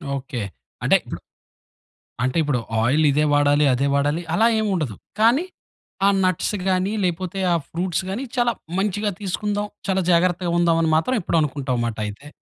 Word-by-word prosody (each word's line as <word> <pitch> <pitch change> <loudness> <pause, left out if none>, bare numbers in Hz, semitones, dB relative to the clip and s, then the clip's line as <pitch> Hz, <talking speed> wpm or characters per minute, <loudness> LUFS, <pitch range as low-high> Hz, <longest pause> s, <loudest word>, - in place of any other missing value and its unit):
Okay. 130 -4 -4 0.4
అంటే, - - +4
ఇప్పుడు - - -7 1.0
అంటే 130 +5 0
ఇప్పుడు 145 -4 0 0.2
ఆయిల్ 145 +7 +3
ఇదే 150 +2 +2
వాడాలి, 145 0 +4
అదే 135 +3 +1
వాడాలి, 145 +4 +1
అలా 220 +6 +4
ఏం 220 - 0
ఉండదు. 145 - -2 0.2
కానీ 240 +10 +4 0.6
ఆ - - +6
నట్స్ 185 +3 0
గాని 185 +1 +1
లేకపోతే 185 +2 -2
ఆ - - +3
ఫ్రూట్స్ 175 +1 -2
గాని 210 +8 -3
చాలా 240 -1 +2 0.3
మంచిగా 205 +1 0
తీసుకుందాం, 205 +2 -2 0.2
చాలా 190 -1 +1
జాగ్రత్తగా 175 0 +2
ఉందాం, 170 -1 +3
అని 165 - +1
మాత్రం 255 +11 0
ఎప్పుడు 170 - 0
అనుకుంటావు, 135 -4 -2
మాట 115 - -5
అయితే. 105 +8 -8
170 Hz, 160 wpm, -22 LUFS, 145-195 Hz, 1.0 s, ఆ